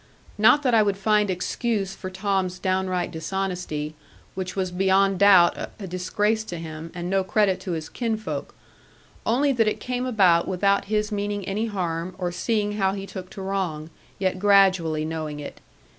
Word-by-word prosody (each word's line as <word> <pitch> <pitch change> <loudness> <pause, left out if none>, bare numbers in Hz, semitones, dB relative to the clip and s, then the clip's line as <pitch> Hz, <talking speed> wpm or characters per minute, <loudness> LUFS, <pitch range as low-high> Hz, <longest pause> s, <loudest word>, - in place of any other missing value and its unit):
Not 220 +8 +5
that 250 -3 +2
I 225 - +6
would 200 -2 +1
find 210 0 +2
excuse 195 +2 -1
for 185 -1 -7
Tom's 190 -1 -1
downright 185 -1 -1
dishonesty, 175 -3 -3 0.4
which 185 -1 -5
was 185 -2 -1
beyond 190 +1 +2
doubt 195 -4 +6 0.2
a 200 - -6
disgrace 205 +4 0
to 175 - -6
him, 160 0 -7
and 175 0 -4
no 190 +1 +1
credit 195 -1 +2
to 180 - -4
his 160 -1 -4
kinsfolk; 220 -3 -4 0.7
only 275 +5 +3
that 230 -4 +2
it 215 - 0
came 250 0 -3
about 185 -8 +4
without 200 +2 +1
his 210 +1 -1
meaning 205 -1 -2
any 210 +4 -1
harm 180 -3 -3
or 180 -2 -2
seeing 210 +3 -1
how 190 -2 +2
he 195 -1 -5
took 185 -2 -8
to 195 - -8
wrong; 175 -5 -3 0.3
yet 185 -1 -1
gradually 185 -6 +4
knowing 155 -2 -4
it. 145 - -9
190 Hz, 170 wpm, -24 LUFS, 180-205 Hz, 0.7 s, I